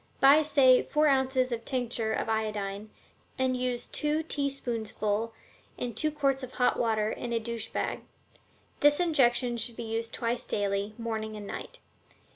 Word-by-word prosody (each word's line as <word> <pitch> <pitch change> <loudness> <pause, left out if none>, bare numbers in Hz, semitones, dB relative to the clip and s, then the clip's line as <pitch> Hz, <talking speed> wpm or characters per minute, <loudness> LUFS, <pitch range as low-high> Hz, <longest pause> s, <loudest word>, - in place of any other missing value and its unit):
Buy, 280 +3 +7
say, 270 -4 +5
four 300 +1 +1
ounces 265 -2 +2
of 230 -1 -3
tincture 240 -3 -2
of 220 - -1
iodine, 215 -2 -2 0.5
and 260 -1 +1
use 250 -1 -2
two 300 +1 -1
teaspoonsful 230 -7 -2 0.5
in 245 -1 -3
two 310 +8 0
quarts 275 -3 0
of 255 -1 -7
hot 250 - +2
water 220 -2 +1
in 240 - -5
a 230 - +1
douche 230 0 -4
bag. - - -2 0.8
This 290 +2 +5
injection 250 -7 +2
should 230 +1 -2
be 235 - -5
used 225 0 -3
twice 235 0 -2
a - - -27
day, 200 0 -1
morning 220 -2 -4
and 210 -1 -7
night. - - -6
240 Hz, 160 wpm, -29 LUFS, 220-270 Hz, 0.8 s, Buy